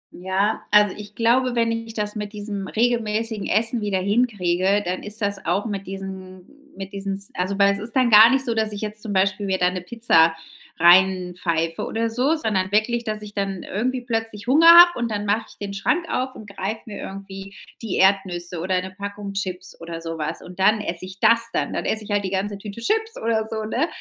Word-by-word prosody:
Ja, 190 +4 -1
also 210 -1 +4
ich 210 0 -11
glaube, 245 +2 +2
wenn 230 -1 +1
ich 230 0 -5
das 210 0 -2
mit 210 0 -5
diesem 205 -2 -5
regelmäßigen 225 -2 -1
Essen 225 +2 +1
wieder 205 -2 -1
hinkriege, 200 -2 +1
dann 180 +1 -3
ist 210 +2 -5
das 200 -1 -2
auch 205 - 0
mit 200 -3 -5
diesem 190 -1 -8 0.3
mit 195 0 -8
diesen 195 0 -3
s 195 0 -7
also 190 +2 -2
weil 200 0 +4
es 200 - -4
ist 225 +5 -4
dann 250 -3 +3
gar 215 +2 +9
nicht 265 +1 +1
so, 235 - 0
dass 220 -1 0
ich 205 - -6
jetzt 215 0 -3
zum 215 -2 -5
Beispiel 195 +1 +1
mir 190 -1 0
da 180 0 +2
'ne 180 -1 -5
Pizza 180 -5 +3 0.4
rein 180 +1 +5
pfeife 165 -2 -1
oder 225 0 -2
so, 255 +7 +1
sondern 200 -9 -1
wirklich, 235 +3 +1
dass 215 -2 -4
ich 210 0 -11
dann 195 -2 -2
irgendwie 250 +5 -2
plötzlich 225 -2 -4
Hunger 300 +6 +4
habe 345 -1 +9
und 235 -2 -2
dann 205 0 -2
mach 210 +3 0
ich - - -17
den 200 -1 -5
Schrank 335 - 0
auf 255 +1 -2
und 215 - -11
greife 200 +3 -4
mir 210 - -7
irgendwie 195 0 -9 0.3
die 215 - -2
Erdnüsse 185 -3 +1
oder 185 +1 0
'ne 185 - -7
Packung 200 0 -6
Chips 185 -2 -5
oder 165 0 -7
so 165 0 -5
was. 155 -1 -4
Und 180 +1 -12
dann 210 +3 +3
esse 170 -2 -4
ich 185 +1 -11
das 230 0 +4
dann. - - -1
Dann - - -3
esse 220 0 -1
ich - - -13
halt 205 -1 0
die 190 - -3
ganze 200 +1 -2
Tüte 205 +2 -9
Chips 445 - -1
oder 220 -1 +1
so, 220 -1 -3
ne, 255 +9 0
205 Hz, 220 wpm, -22 LUFS, 190-225 Hz, 0.4 s, gar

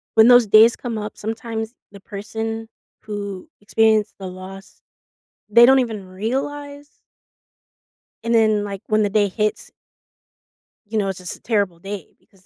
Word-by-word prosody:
When 220 0 +7
those 245 -1 +7
days 220 +3 +7
come 235 -3 -5
up, 210 0 -7
sometimes 225 +1 -5 0.2
the 200 - -12
person 225 +2 -5 0.3
who 205 +3 -6
experienced 220 0 +2
the 190 - -6
loss, 190 +1 -11 0.7
they 235 +3 +8
don't 265 +1 +6
even 220 -6 -4
realize 285 +9 -4 1.4
and 230 +1 0
then, 215 -2 +3
like, 200 -2 -6
when 215 0 +2
the 205 - +1
day 205 0 +2
hits 215 +2 -2 1.2
you 220 +2 -3
know, 200 -2 0
it's 190 - -5
just 180 -1 -6
a - - -20
terrible 200 -7 0
day 195 -2 -8
because 195 -4 -28
215 Hz, 150 wpm, -21 LUFS, 200-225 Hz, 1.4 s, they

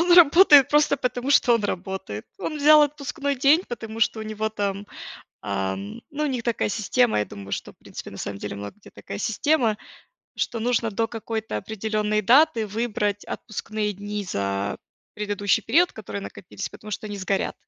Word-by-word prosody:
он 345 +1 +3
работает 320 -4 +8
просто 295 -1 +3
потому, 250 0 -2
что 250 -3 +5
он 225 -3 0
работает. 190 - -4
Он 305 - -4
взял 300 +1 +7
отпускной 285 0 -2
день, 285 +7 +4
потому 225 -2 -6
что 220 0 +2
у - - -4
него 215 0 -2
там, 205 -1 -3 0.6
ам, 100 0 -3
ну, 295 +1 -3
у - - +2
них 255 -4 -2
такая 235 -2 0
система, 230 - +2
я 105 - 0
думаю, 100 -1 -10
что, - - -4
в - - -40
принципе, - - -9
на - - -10
самом 100 - -5
деле 105 - -5
много 100 - -7
где 210 - -16
такая - - -8
система, 225 +1 +1 0.6
что 230 - -1
нужно 230 -1 0
до 225 +3 0
какой-то 220 - -4
определённой 215 - -1
даты 245 0 +4
выбрать 210 -1 -2
отпускные 215 -1 -4
дни 205 +1 -5
за 100 - -2 0.4
предыдущий 205 -1 0
период, 350 +2 +3
который 205 -2 -6
накопился, 190 0 -7
потому 215 - -11
что 215 - -4
они 205 -1 -6
сгорят. 195 0 -1
220 Hz, 175 wpm, -24 LUFS, 200-255 Hz, 0.6 s, работает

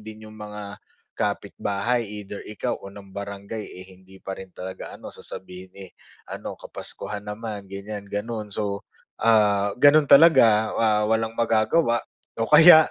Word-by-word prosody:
din 110 0 -10
yung 110 - -14
mga, 105 -1 -8 0.4
kapitbahay 105 +5 -1
either 105 -1 -8
ikaw 105 - -3
o 100 - -10
ng 100 -1 -13
barangay, 100 +2 -6
eh, 95 -2 -10
hindi 95 0 -17
pa 95 0 -6
rin 95 -1 -10
talaga 95 +1 -8
ano - - -10
sasabihin, 90 0 -9
eh, 95 -2 -10 0.4
ano - - -6
kapaskuhan 105 -1 -6
naman 105 -1 -6
ganyan 100 +1 -6
gano'n. 105 +1 -4
So, 100 0 -3 0.4
ah, 105 -3 +4
gano'n 145 +1 +6
talaga, 115 -9 +6
ah, 105 -2 +2
walang 110 +1 -1
magagawa, 115 +2 +2 0.4
o 115 - 0
kaya 160 +1 +9
105 Hz, 145 wpm, -24 LUFS, 100-115 Hz, 0.4 s, kaya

